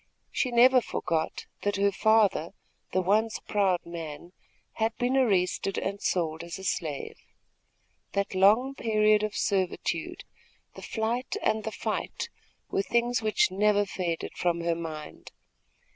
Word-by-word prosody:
She 255 - 0
never 250 +2 +6
forgot 160 -7 -2 0.2
that 205 - 0
her 200 0 +2
father, 205 -5 +3 0.4
the 185 - +1
once 215 +4 +2
proud 190 -4 0
man, 165 -1 -7 0.5
had 225 +1 +1
been 250 +2 +1
arrested 195 -6 +1
and 200 +1 -3
sold 160 -2 -1
as 170 0 -6
a 190 - -10
slave. 155 -6 -3 1.0
That 200 0 -1
long 215 +8 +4
period 215 -4 +3
of 215 -1 -2
servitude, 190 -3 -1 0.5
the - - -11
flight 235 +3 -2
and 220 0 +1
the 220 - -3
fight 220 - -3 0.4
were - - +2
things 235 +2 +1
which 215 -3 +2
never 205 +1 +3
faded 175 -4 -3
from 170 -1 0
her 170 0 +1
mind. 160 -2 -7
200 Hz, 135 wpm, -28 LUFS, 175-220 Hz, 1.0 s, never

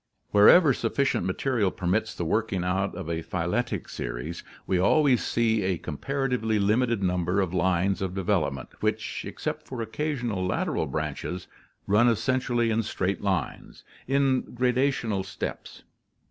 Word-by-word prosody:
Wherever 135 - +7
sufficient 120 -4 0
material 110 +1 +1
permits 95 +5 -1
the 85 - -3
working 95 0 0
out 95 +2 -1
of - - -6
a 85 0 -2
phyletic 95 +5 -2
series, 75 +8 -5 0.2
we 95 - +1
always 130 - +4
see 115 -2 +1
a 95 -2 0
comparatively 125 - -1
limited 110 +1 +1
num 90 -1 +1
ber 90 +4 0
of 95 -3 0
lines 95 +1 +1
of 95 -1 -3
development, 85 - -1
which, - - -2
except - - -5
for 130 - -6
occasional 120 -4 -2
lateral 90 - -1
branches, 80 +4 -4 0.4
run 105 +4 +4
essentially 120 0 +1
in 110 +1 +2
straight 95 -3 -2
lines, 95 -3 -3 0.2
in 135 -1 +2
gradational 125 -5 +1
steps. 95 0 -6
105 Hz, 135 wpm, -26 LUFS, 90-120 Hz, 0.4 s, Wherever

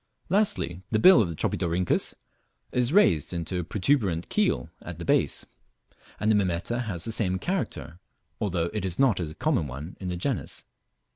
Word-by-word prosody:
Lastly, 95 - +1
the 110 - +1
bill 185 - +8
of 95 - 0
the 85 - -5
Tropidorhynchus 85 +3 0 0.6
is 125 +1 +1
raised 90 - +4
into 85 +2 -3
a - - -2
protuberant 95 - 0
keel 195 - 0
at 90 -3 -8
the 85 - -7
base, - - +2 0.7
and 110 - +2
the - - +4
Mimeta 100 +4 0
has 90 -5 -3
the 115 - -1
same 95 -4 0
character, 125 - -3 0.4
although 85 -4 -1
it 105 - -2
is 90 -2 -1
not 130 -8 +3
a 80 -3 -4
common 130 - 0
one 70 +7 -7
in 95 - -5
the 90 - -3
genus. 120 +6 -3
95 Hz, 170 wpm, -27 LUFS, 85-120 Hz, 0.7 s, bill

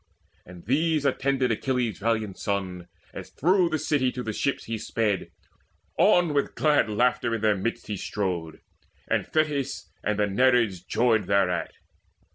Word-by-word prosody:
And 90 -2 -12
these 155 - +1
attended 135 -2 +1
Achilles' 125 -1 -1
valiant 110 -2 -1
son, 95 -3 -3 0.3
As - - -8
through 180 +3 +2
the 155 - 0
city 140 -4 +1
to 125 - -5
the 110 - -3
ship 140 +6 -1
he 115 -1 -5
sped. 105 -3 -1 0.7
On, 175 -4 +4
with 140 -1 0
glad 150 -7 +3
laughter, 120 +1 +1
in 110 - -4
their 105 -1 +3
midst 115 +5 -3
he 105 - -4
strode; 90 -6 -3 0.5
And - - 0
Thetis 145 -4 -1
and 105 -1 0
the 105 - +2
Nereids 115 -3 +2
joyed 115 -4 +1
thereat. 95 -4 +1
115 Hz, 150 wpm, -26 LUFS, 100-140 Hz, 0.7 s, On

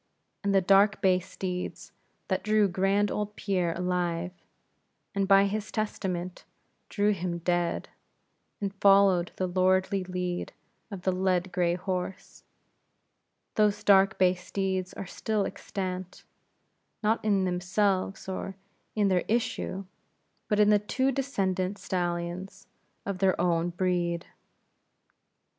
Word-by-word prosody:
And 200 0 +1
the 195 - +5
dark 195 +2 +4
bay 185 -2 +3
steeds 180 0 -5 0.4
that - - 0
drew 215 -1 +3
grand 195 +3 +1
old 210 0 -3
Pierre 180 -4 0
alive, 180 -1 -1 0.8
and 200 -1 0
by 195 0 +6
his 210 +1 -3
testament 185 -4 -3 0.5
drew 205 -1 +2
him 180 -3 -2
dead, 175 0 -1 0.7
and 200 -1 -3
followed 195 -3 +5
the 185 - -1
lordly 185 +2 +2
lead 180 -1 -3 0.4
of 195 -4 -7
the 190 - +2
led 185 0 0
gray 175 -1 +1
horse; 185 0 -5 1.1
those 210 -1 +2
dark 195 -1 +5
bay 185 -1 +4
steeds 185 0 -3
are - - -5
still 210 +2 -1
extant; 185 -2 -5 0.8
not 220 +2 +1
in 200 -3 +2
themselves 185 +2 0
or 190 0 -4 0.4
in 210 -2 +3
their 185 -2 +2
issue; 210 -4 -1 0.6
but 210 -1 +1
in 210 0 +6
the 210 - +5
two 260 +6 0
descendants 195 -8 -1
of - - -13
stallions 180 +2 -3 0.4
of 200 -2 -3
their 190 -1 +2
own 170 -1 +2
breed. 175 -1 -1
190 Hz, 125 wpm, -28 LUFS, 180-200 Hz, 1.1 s, by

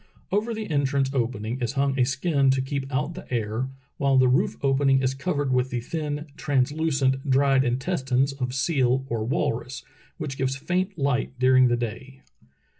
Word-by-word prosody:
Over 220 +4 0
the 215 -1 -5
entrance 140 -2 +1
opening 120 -2 -2
is 120 +1 -1
hung 140 -1 0
a 125 - +5
skin 135 +1 +1
to 130 0 +2
keep 135 0 -4
out 145 +5 -1
the 185 -4 -11
air, 115 +2 -1 0.3
while 140 -1 +2
the 130 0 +5
roof 125 +1 +2
opening 135 0 +3
is 130 0 +1
covered 140 -1 -1
with 125 0 +1
the 125 - -2
thin, 150 +3 -4
translucent, 135 -1 0
dried 135 0 +4
intestines 135 0 0
of 130 -2 -2
the 125 - -6
seal 130 -2 +1
or 115 -2 -1
walrus, 125 -1 -2 0.3
which 135 -2 -5
gives 135 0 0
famt 185 +7 -2
light 135 -2 -1
during 130 0 +5
the 120 0 +1
day. 130 +4 -6
135 Hz, 175 wpm, -25 LUFS, 125-140 Hz, 0.3 s, a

